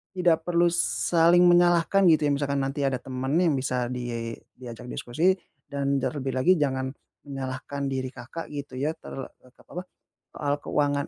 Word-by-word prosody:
tidak 170 -3 +3
perlu 175 0 +3
saling 165 - +4
menyalahkan 175 +2 +4
gitu 155 -1 +3
ya, 145 - +2
misalkan 140 0 -1
nanti 135 +2 -2
ada 135 -2 +1
temen 130 +1 -4
yang 175 -4 +3
bisa 125 -2 -1
di 120 -2 -4 0.2
diajak 125 0 -9
diskusi 165 +10 +1 0.4
dan 140 -1 0
terlebih 135 0 -2
lagi 175 +9 +4
jangan 130 -2 0 0.4
menyalahkan 135 +1 -4
diri 130 -1 -2
Kakak, 130 +7 -8
gitu 140 -3 -6
ya, 145 +3 +1
ter 160 - -11
eee, 125 - -15
te - - -21
apa, 180 - -7 0.5
soal 145 -1 -1
keuangan 145 -1 0
140 Hz, 165 wpm, -26 LUFS, 130-165 Hz, 0.5 s, saling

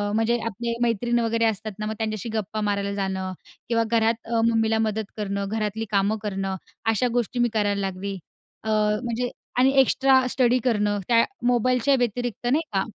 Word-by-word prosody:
म्हणजे 225 +2 +2
आपले 235 +2 -3
मैत्रीण 240 +1 +1
वगैरे 230 0 +1
असतात 215 0 -1
ना, 215 - -2
मग 220 - -2
त्यांच्याशी 220 0 -3
गप्पा 215 0 -2
मारायला 200 -1 -1
जाणं 190 -1 -2 0.4
किंवा 230 -1 +2
घरात 225 0 +3
अ, 230 0 0
मम्मीला 225 -1 +2
मदत 220 -1 -1
करणं, 200 -1 -2
घरातली 220 0 -2
कामं 205 +2 +2
करणं. 195 -2 -2 0.4
अशा 245 +3 +1
गोष्टी 245 +1 -1
मी 240 0 +3
करायला 205 -2 +1
लागली. 195 +1 -3 0.5
अ, 220 - -3
म्हणजे 220 +3 0 0.3
आणि 260 +2 +5
एक्स्ट्रा 265 0 +4
स्टडी 250 0 +3
करणं, 210 -4 +1
त्या 230 -1 +5 0.2
मोबाईलच्या 250 +3 +3
व्यतिरिक्त, 245 0 -2
नाही 290 +6 +3
का. 190 - +2
220 Hz, 165 wpm, -24 LUFS, 205-240 Hz, 0.5 s, आणि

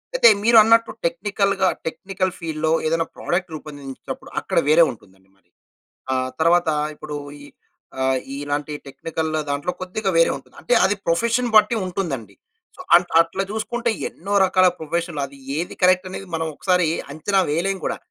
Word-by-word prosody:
అయితే 370 - +6 0.2
మీరు 230 +1 +6
అన్నట్టు 230 0 +4
టెక్నికల్‌గా, 195 +2 +1 0.2
టెక్నికల్ 185 +2 -3
ఫీల్డ్‌లో 160 -2 -2 0.2
ఏదైనా 165 +1 +1
ప్రొడక్ట్ 175 0 -2
రూపొందించినప్పుడు, 145 -3 -8
అక్కడ - - -4
వేరే 165 +2 +7
ఉంటుందండి 95 -4 -18
మరి. 90 -2 -37 0.6
ఆ - - +2 0.3
తర్వాత 170 +1 +3 0.3
ఇప్పుడు 150 -1 -7 0.2
ఈ - - -12 0.6
ఆహ్, 130 0 +2 0.2
ఇలాంటి 145 +1 -3
టెక్నికల్ 160 +3 -4 0.2
దాంట్లో 145 +5 -1
కొద్దిగా 190 +2 -2
వేరే 165 - +5
ఉంటుంది. 135 - -15
అంటే 245 - +1
అది 195 +2 +3
ప్రొఫెషన్ 230 +8 +1
బట్టి 215 +2 +6
ఉంటుందండి. 150 - -4 0.4
సో - - -13
అంట్ 175 0 +5
అట్లా 170 +3 0
చూసుకుంటే 235 +2 -2 0.2
ఎన్నో 195 +5 -8
రకాల 185 0 +4
ప్రొఫెషన్లు 170 0 -3
అది 140 0 -16 0.2
ఏది 170 +2 -3
కరెక్ట్ 185 +1 +4
అనేది 190 +1 -7
మనం 165 0 -1
ఒకసారి 180 +1 +1 0.3
అంచనా 190 +6 +1
వేయలేం 190 +5 0
కూడా. - - -1
170 Hz, 150 wpm, -22 LUFS, 150-195 Hz, 0.6 s, వేరే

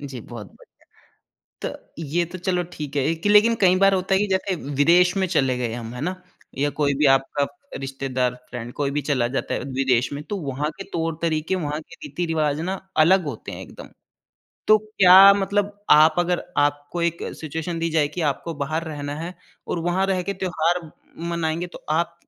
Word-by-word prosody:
जी 135 -4 -7
बहुत 110 -3 -9 0.9
बढ़िया। - - -8
तो, - - -9 0.3
ये 165 +4 0
तो 175 +2 -8
चलो 180 0 -1
ठीक 150 -2 -7
है 140 - +2
ए - - +2
कि 175 +6 -2
लेकिन 215 +3 +6
कई 185 -1 +5
बार 195 0 +5
होता 185 +1 0
है - - +3
कि 210 - +1
जैसे 190 0 0 0.2
विदेश 180 +5 +5
में 190 - +2
चले 135 -6 +1
गए 120 -2 -2
हम, 120 0 -6
है 125 - -7
ना? 185 +3 -3 0.4
या 145 +1 +1
कोई 145 0 0
भी 150 - +2
आपका 135 +1 +1 0.3
रिश्तेदार, 135 -2 -2 0.2
फ्रेंड 120 -1 -6
कोई 140 -1 -1
भी 150 - +1
चला 130 -4 0
जाता 130 +3 -3
है, - - -1
विदेश 130 -2 +1
में 145 +1 -5
तो 205 - -4
वहाँ 140 +1 -2
के 195 - -6
तौर-तरीक़े, 165 +1 -1
वहाँ 150 -4 -3
के - - -15
रीति-रिवाज 160 - -1
ना 185 +3 -2 0.3
अलग 185 +3 +4
होते 140 -7 -6
हैं - - -7
एकदम। - - -11 0.8
तो 215 - +7
क्या 195 -2 +7
मतलब 200 +1 -1
आप 155 +1 +7
अगर 175 0 0
आपको 145 +3 0
एक 170 0 0 0.2
सिचुएशन 160 +2 -4
दी 165 - 0
जाए 155 -2 +2
कि 170 +4 -5
आपको 165 +4 -5
बाहर 155 +2 -2
रहना 145 -2 -5
है 170 +3 -6 0.3
और 170 - -2
वहाँ 175 +3 0
रह 185 -2 +1
के - - 0
त्योहार 180 -2 0 0.5
मनाएँगे, 170 +1 -2
तो 175 - -13
आप 170 +2 0
160 Hz, 195 wpm, -23 LUFS, 145-180 Hz, 0.9 s, तो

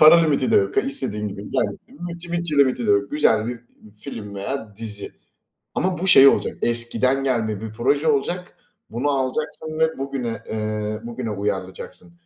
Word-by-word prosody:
Para 160 +2 +8
limiti 145 -5 +1
de - - +4
yok. 100 0 +1
İstediğin 105 -6 +2
gibi 100 0 -8
gel. - - +1 0.3
Yani - - -18
bütçe 170 0 -6
mütçe 170 -3 +1
limiti 130 -4 +2
de - - +3
yok. 100 0 +2
Güzel 115 -7 +2
bir 120 -1 -6 0.4
film 105 -4 -8
veya 105 +1 -5
dizi 105 -2 0 0.6
ama 185 0 -1
bu 185 - -2
şey 140 -7 +9
olacak. - - 0
Eskiden 120 +3 +2
gelme 110 -6 -1
bir 110 -1 -7
proje 140 +7 0
olacak. 175 +5 -1 0.3
Bunu 125 +6 -1
alacaksın 150 +3 -3
ve 160 -1 +1
bugüne, 135 -4 -4
ııı, 110 0 -3
bugüne 120 -1 -5
uyarlayacaksın. 100 - -5
125 Hz, 165 wpm, -22 LUFS, 110-145 Hz, 0.6 s, şey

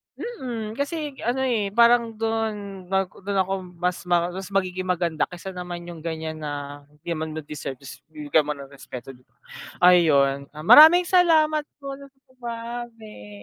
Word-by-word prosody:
mm, 245 - -5
kasi 295 -2 -3
ano 250 +3 -1
eh, 225 -6 0
parang 235 -1 +4
dun 215 -4 -3
pag 190 -1 0
dun 200 0 -4
ako 190 +1 -3 0.2
mas 180 +1 -3
ma 175 0 +2
mas 190 +1 -6
magiging 185 -2 -2
maganda 170 -3 0
kaysa 180 +2 -8
naman 180 -1 -7
yung 170 -2 -9
ganyan 160 -1 -5
na 145 -1 -6
hindi 150 +2 -25
naman 160 -1 -4
nila 155 - -5
deserve 145 -3 -6
tapos 130 - -10
bibigyan 150 -1 0
mo 150 - -2
ng 140 0 -11
respeto 130 -1 -9
di 125 -1 -20
ba - - -41 0.5
ayun, 140 -6 +4
ah, 155 - -8
maraming 320 - +9
salamat 315 -4 +3
po 275 -1 -8
dun 280 - -12
sa 270 -1 -30
bahagi. 230 - -7
185 Hz, 170 wpm, -24 LUFS, 155-235 Hz, 0.5 s, maraming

